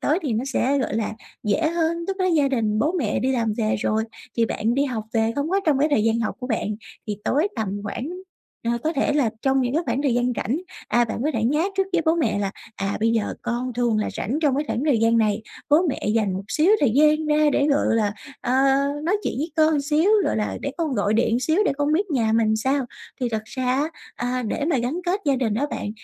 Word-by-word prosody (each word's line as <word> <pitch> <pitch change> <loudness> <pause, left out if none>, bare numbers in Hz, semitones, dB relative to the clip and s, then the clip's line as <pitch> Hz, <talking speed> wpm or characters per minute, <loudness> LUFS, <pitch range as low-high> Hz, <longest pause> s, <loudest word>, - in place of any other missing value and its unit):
tối 310 +5 +2
thì 280 -6 -1
nó 225 +3 -1
sẽ, 275 +3 +2
gọi 255 - -2
là, 225 -1 -1 0.3
dễ 300 +9 +1
hơn, 335 0 -1
lúc 390 - -1
đó 370 - +1
gia 305 -6 +3
đình, 220 -5 0
bố 305 +10 +1
mẹ 285 - 0
đi 260 +1 +1
làm 230 -4 0
về 215 -1 +1
rồi, 220 +1 0 0.3
thì 230 - +3
bạn 225 +2 -1
đi 280 - +2
học 235 -6 -3
về, 225 0 +1
không 285 +3 -1
có 390 +1 +2
trong 295 -4 +3
cái 295 +3 +3
thời 220 -7 +2
gian 225 +1 +2
học 220 - -1
của 250 - -4
bạn, 225 -4 -1 0.4
thì 210 - -3
tối 310 +9 +2
tầm 220 -3 -1 0.2
khoảng 235 +6 -4 0.6
ờ, 230 - +1
có 315 - +1
thể 285 0 +1
là 275 -7 +2
trong 270 0 +2
những 250 +2 -1
cái 325 - +2
khoảng 250 +4 0
thời 270 -5 +2
gian 245 +1 +1
rảnh. 245 +8 -1 0.3
À, 240 +2 +3
bạn 225 +1 -4
có 305 - +2
thể 220 - 0
nhá 295 +7 +2
trước 390 - +4
với 340 - +2
bố 320 - +4
mẹ 320 -10 0
là, 200 -1 -1 0.3
à: 195 0 -2
"Bây 225 +1 +3
giờ 225 -2 0
con 240 +1 -2
thường 240 -3 +1
là 215 - 0
rảnh 265 +8 -2
trong 275 -3 +3
cái 295 - 0
khoảng 255 - -2
thời 280 -7 +3
gian 230 0 +4
này, 215 0 +1 0.3
bố 295 - +7
mẹ 265 - -3
dành 215 -4 +1
một 190 - -4
xíu 310 - +3
thời 280 - +4
gian 305 +2 +4
ra 300 0 +3
để, 280 - +2
gọi 285 0 +2
là, 210 -2 +1 0.3
ờ, 245 - -1 0.5
nói 350 +6 +1
chuyện - - -2
với 310 +4 -2
con 310 -2 +4
xíu, 310 +7 +2
gọi - - 0
là, 210 - -2
để 280 - -2
con 320 -5 -1
gọi 205 -1 +1
điện 235 +1 +2
xíu 315 +6 +1
để - - +2
con 290 +1 +1
biết 375 +3 +1
nhà 230 -6 +1
mình 225 0 +3
làm 220 - +2
sao." 265 +3 0 0.3
Thì 250 - 0
thật 220 -2 -2
ra 255 +3 -5
á, 285 +5 +1 0.2
a, 250 +1 -2
để 235 +5 -2
mà 305 -3 +1
gắn 250 +9 -2
kết 380 +4 +1
gia 275 -2 +2
đình 230 -5 0
đó 270 +7 0
bạn, 205 - -3
255 Hz, 265 wpm, -23 LUFS, 225-300 Hz, 0.6 s, bố